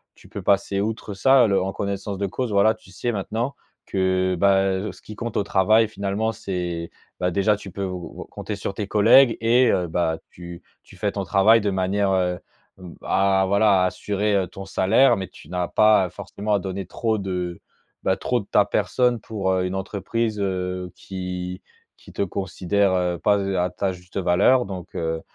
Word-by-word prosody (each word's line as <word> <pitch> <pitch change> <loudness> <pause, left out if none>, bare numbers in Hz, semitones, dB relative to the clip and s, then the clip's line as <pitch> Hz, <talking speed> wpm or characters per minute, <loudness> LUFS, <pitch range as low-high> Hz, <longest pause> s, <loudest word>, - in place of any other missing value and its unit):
tu - - -18
peux - - -7
passer 100 0 +1
outre 110 0 -3
ça, 125 +4 +5
le 100 -2 +2
en 95 +1 -2
connaissance 100 0 -4
de 100 +1 -1
cause. 125 +4 -3
Voilà, 105 +2 +4
tu 95 - -18
sais 120 +6 -2
maintenant 110 +6 -3 0.3
que, 95 -1 0
bah, 95 +1 +4
heu, 95 +2 -1
ce - - -17
qui 105 - -10
compte 115 0 -4
au - - +2
travail, 110 +3 +3
finalement, 105 +2 -2
c'est 90 -4 -4 0.3
bah 90 0 0
déjà 100 +3 +2
tu 100 -2 -10
peux 100 +1 -4
ou 90 -2 -7
ou - - -18
compter 105 - -6
sur 100 0 -4
tes 100 0 -4
collègues 115 +5 +5
et 120 +3 +4
heu, 90 -2 0
bah, 80 -1 0
tu 85 -1 -10 0.2
tu - - -17
fais - - -1
ton - - -2
travail 110 +3 +4
de 105 - 0
manière, 95 +1 0
heu, 90 -1 +1 0.4
b 90 -3 -11
à 95 0 +2
voilà, 100 -2 +4
à - - +3
assurer, 105 +2 -1
heu, 95 -2 +2
ton 95 +3 -9
salaire, 100 +7 +4
mais 95 -1 -4
tu - - -16
n'as 90 -1 -2
pas, 110 -3 +4
heu, - - -11
forcément 105 +5 -4
à 100 - +1
donner 95 0 -5
trop 110 +5 -1
de, 90 -3 -4 0.4
bah, 95 - +1
trop 125 - 0
de 100 - -13
ta 105 - +5
personne 125 +3 +1
pour, 100 -4 -3
heu, 90 0 0
une 90 - -3
entreprise, 105 +3 -2
heu, 90 -1 -3
qui 90 -1 -6 0.3
qui - - -16
te - - -3
considère 95 -2 0
pas 105 -1 +3
z 100 - -2
heu, 95 - -1
à 90 - +1
ta 95 +1 -2
juste 90 +1 -11
valeur. 100 +8 +3
Donc 95 -3 -8
heu, 80 0 -2
95 Hz, 205 wpm, -23 LUFS, 90-105 Hz, 0.4 s, ça